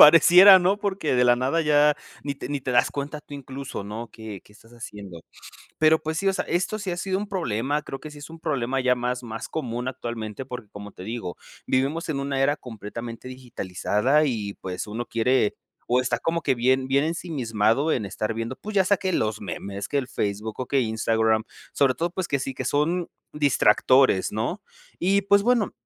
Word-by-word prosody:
pareciera, 180 +5 +10
¿no?, 185 +3 +2
porque 195 -8 -1
de 125 0 +4
la 120 0 +5
nada 135 +7 +1
ya, 150 0 +4 0.3
ni 140 -1 -3
te - - -7
ni 145 -1 -2
te 130 - -4
das 120 -1 +3
cuenta 145 +2 -5
tú 145 - -11
incluso, 135 -5 -7
¿no?, 110 +3 -6
que 110 -4 -9
que - - -20
estás 115 +3 -20
haciendo. 100 -7 -9 0.6
Pero, 155 0 +5
pues 160 0 -2
sí, 195 - +1
o - - +3
sea, - - -2
esto 180 +5 -1
sí 200 -3 -4
ha 175 - -2
sido 190 +1 -1
un 205 +1 -5
problema, 145 - -1
creo 135 -2 -7
que 155 - -8
sí, 150 - -11
es 145 +2 -10
un 165 0 -11
problema 135 -5 -1
ya 125 -1 +3
más 125 +1 -2
más 110 -1 -6
común 125 -4 -3
actualmente, 115 -2 -5
porque, 125 -4 -8
como 105 0 -9
te - - -11
digo, 110 -4 -5 0.3
vivimos 140 +6 0
en 145 -3 -1
una 140 -1 -2
era 145 +2 +3
completamente 115 0 -8
digitalizada, 130 +2 0
y 105 -7 -2
pues, 95 +1 -5
uno 115 +3 -5
quiere, 115 -1 +1 0.3
o 125 +1 +3
está 125 - 0
como 165 0 -1
que 135 - +2
bien 130 +2 +2
bien 140 +2 +3
ensimismado 140 - 0
en 110 - 0
estar 110 +3 -3
viendo, 115 +3 -4
pues, 215 0 -8
ya 190 - +5
sea 205 +2 +3
que 190 0 -2
los 110 -6 0
memes, 100 +1 -5
que 145 - 0
el 130 - -3
Facebook, 105 +1 -3
que 140 - +2
Instagram, 110 -1 +1 0.3
sobre 135 -2 +3
todo, 170 +4 -1
pues, 185 0 -4
que 140 - +1
sí, 135 0 -4
que 130 - -4
son 165 +6 0 0.2
distractores, 135 -6 +4
¿no?, 110 - -2 0.4
y 195 +3 +2
pues, 200 0 +4
bueno, 235 -2 +2
130 Hz, 205 wpm, -25 LUFS, 115-155 Hz, 0.6 s, pareciera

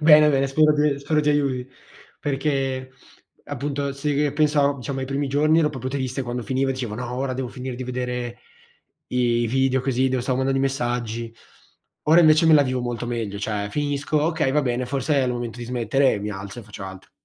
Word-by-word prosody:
Bene, 150 -1 +7
bene, 135 -1 +2
spero 150 +3 +4
ti 150 -1 +2
spero 150 +2 +1
ti 150 - 0
aiuti. 135 -3 0 0.5
Perché, 135 -2 -1 0.5
appunto 140 0 -3
se 145 +1 -2
che 145 0 +1
pensavo, 145 -1 +2
diciamo, 135 +2 -4
ai 130 - -3
primi 140 +1 -1
giorni 150 +4 +3
ero 155 -2 +3
proprio 130 -3 -5
triste 130 0 -2
quando 120 0 -4
finiva, 135 +1 0
e - - +2
dicevo: 125 -5 -4
"No, 125 +2 -5
ora 130 +1 -2
devo 130 -1 -3
finire 125 +1 -6
di 130 - -5
vedere 125 -1 -4 0.7
i 120 -1 +1
i 120 - +1
video 130 +1 +2
così, 130 0 +1
devo 130 -1 -1
stavo 125 0 0
mandando 135 0 +1
i - - 0
messaggi." 120 -3 -2 0.7
Ora 160 +3 +7
invece 155 0 +5
me 160 - +7
la 145 - +7
vivo 130 -1 -1
molto 120 -1 -3
meglio, 115 -4 -3
cioè, 105 -1 -2
finisco: 145 +2 -1
"Okay 155 -4 +1
va 150 0 +2
bene, 125 0 -1
forse 140 +3 -1
è 135 -2 +3
il 125 - 0
momento 120 -1 -5
di 120 - -5
smettere;" 125 0 +1
mi 105 +1 -3
alzo 100 +3 -7
e - - -12
faccio 100 -2 -9
altro. 95 0 -10
130 Hz, 210 wpm, -23 LUFS, 120-145 Hz, 0.7 s, Bene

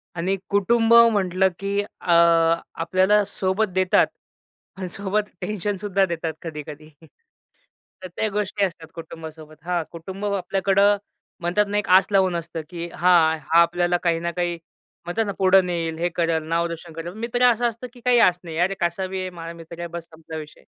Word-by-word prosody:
आणि 185 +3 0
कुटुंब 225 +3 +3
म्हटलं 195 -5 +5
की 200 +1 -1
अ, 205 -3 -5 0.6
आपल्याला 185 +5 +2
सोबत 195 +2 -1
देतात 185 0 +3 0.7
अन् 190 -1 -4
सोबत 205 +2 -2
टेन्शन 205 +1 -2
सुद्धा 195 0 +1
देतात 165 -2 -3
कधी-कधी. 155 -1 -8 1.1
तर - - -5
त्या 220 - 0
गोष्टी 205 0 -1
असतात 165 -3 -7
कुटुंबासोबत. 160 -1 -10
हां, 175 -1 -1
कुटुंब 190 +5 -7
आपल्याकडं 200 +1 +2 0.4
म्हणतात 180 +4 +1
ना 205 - -1
एक 210 - -2
आस - - -7
लावून 190 -3 +3
असतं 165 -1 -4
की 170 -1 -6
हां, 165 -2 +4
हा 165 +4 +4
आपल्याला 175 +1 +2
काही 170 -2 +1
ना 170 +1 -2
काही 175 -1 -2 0.5
म्हणतात 215 +6 -1
ना 200 - -2
पुढे 190 0 +6
नेईल, 170 -3 -3
हे 175 +1 0
करेल, 165 -2 0
नाव 170 +1 +1
रोशन 170 0 -8
करेल, 165 +2 -6
मित्र 235 +3 -2
असं 240 +1 +1
असतं 235 +2 -9
की 250 - -15
काही 245 -1 +5
आस 180 -5 +4
नाही. 165 -2 -7
"अरे 185 +3 +1
कसा 170 +2 -1
बी 190 0 -4
आहे. 185 - -4
माझा 170 -1 -8
मित्र 170 0 -11
आहे. 170 - -4
बस 170 0 -7
संपला 160 0 -9
विषय." 150 -1 -10
180 Hz, 175 wpm, -23 LUFS, 170-200 Hz, 1.1 s, पुढे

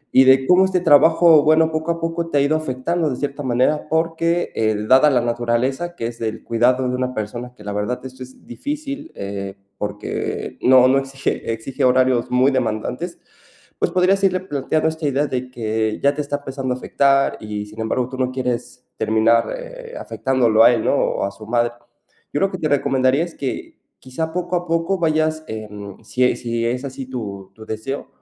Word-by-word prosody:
y 130 - +8
de 130 0 +5
cómo 180 +1 +6
este 190 -1 +1
trabajo, 160 0 +6
bueno, 160 +1 +4
poco 160 +1 -1
a 170 - -3
poco 165 0 -2
te 145 - 0
ha - - +3
ido 140 +3 +2
afectando 155 +3 -1
de 130 - -3
cierta 145 +1 -4
manera. 130 +5 +1
Porque, 165 +2 0
eh, 110 -1 +1
dada 130 +5 +6
la 130 -4 +3
naturaleza 120 +7 -1
que 115 - -2
es 115 0 -9
el 110 -1 -3
cuidado 125 +3 +2
de 125 - -1
una 125 0 -2
persona, 120 +3 -5
que 105 - -15
la 105 - -4
verdad 105 +5 -2
esto 130 0 -8
es 130 +1 -16
difícil, 290 - -5
eh, 100 0 -5 0.2
porque 105 0 -4
no 130 0 +6
no, 135 +1 +4
exige 135 -3 -3
exige 115 +4 -4
horarios 130 -1 +3
muy 130 +2 +4
demandantes, 125 +7 -2 0.6
pues, - - +1
podrías 185 +2 +2
irle 185 -1 +3
planteando 155 -2 -1
esta 160 0 -6
idea 140 +1 +1
de 125 -1 -4
que 110 -2 -2
ya 140 +1 +3
te - - -1
está 145 0 -2
empezando 135 -2 -4
a - - -5
afectar, 135 +1 +2
y, 105 -1 -5
sin 105 +2 -9
embargo, 120 +2 -1
tú 130 - -7
no 130 -1 0
quieres 125 -1 -4
terminar, 110 +1 +2
eh, - - -10
afectándolo 120 -4 +2
a 120 - +8
él, 115 -2 -1
¿no?, - - +3
o - - 0
a 100 - -3
su 110 - -12
madre. 120 0 +1 0.6
Yo 145 - 0
lo 195 - +2
que 185 - -4
te 155 - -1
recomendaría 135 0 +2
es 170 -1 -7
que, 135 - -5 0.2
quizá, 145 +5 -4
poco 180 0 -2
a 175 0 -2
poco 165 +3 0
vayas, 155 -1 +1
em, 105 -2 -8
si 125 +3 -1
e - - +2
si 115 -1 -2
es 125 +3 -2
así 135 0 -6
tu 100 -7 -6
tu 110 - -12
deseo, 110 +6 -5
130 Hz, 200 wpm, -20 LUFS, 120-155 Hz, 0.6 s, y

